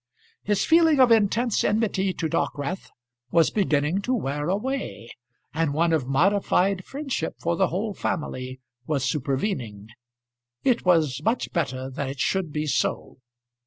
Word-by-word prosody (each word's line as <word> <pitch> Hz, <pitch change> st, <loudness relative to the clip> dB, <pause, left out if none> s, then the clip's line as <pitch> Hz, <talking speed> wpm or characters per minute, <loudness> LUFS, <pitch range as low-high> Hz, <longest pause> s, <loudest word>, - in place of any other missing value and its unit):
His 205 Hz, -1 st, 0 dB
feeling 320 Hz, -3 st, +5 dB
of 255 Hz, -2 st, +6 dB
intense 225 Hz, +1 st, +3 dB
enmity 205 Hz, -3 st, +1 dB
to 165 Hz, -3 st, -3 dB
Dockwrath 150 Hz, +3 st, -2 dB, 0.4 s
was 165 Hz, +3 st, +3 dB
beginning 165 Hz, -2 st, +1 dB
to 255 Hz, +5 st, 0 dB
wear 145 Hz, -, -2 dB
away, 205 Hz, -, -3 dB, 0.4 s
and 160 Hz, -3 st, 0 dB
one 165 Hz, +1 st, +2 dB
of 145 Hz, -6 st, 0 dB
modified 190 Hz, +5 st, +2 dB
friendship 270 Hz, -, -4 dB
for 170 Hz, 0 st, 0 dB
the 190 Hz, +1 st, +2 dB
whole 205 Hz, +5 st, -2 dB
family 130 Hz, -8 st, -4 dB, 0.3 s
was 140 Hz, -4 st, 0 dB
supervening. 130 Hz, -, -2 dB, 0.7 s
It 245 Hz, -6 st, +2 dB
was 155 Hz, -7 st, +3 dB
much 225 Hz, +9 st, -1 dB
better 130 Hz, -6 st, -2 dB
that 135 Hz, +1 st, -3 dB
it 135 Hz, 0 st, -7 dB
should 185 Hz, +1 st, 0 dB
be 150 Hz, +1 st, -2 dB
so. 140 Hz, -2 st, -1 dB
170 Hz, 140 wpm, -25 LUFS, 140-205 Hz, 0.7 s, of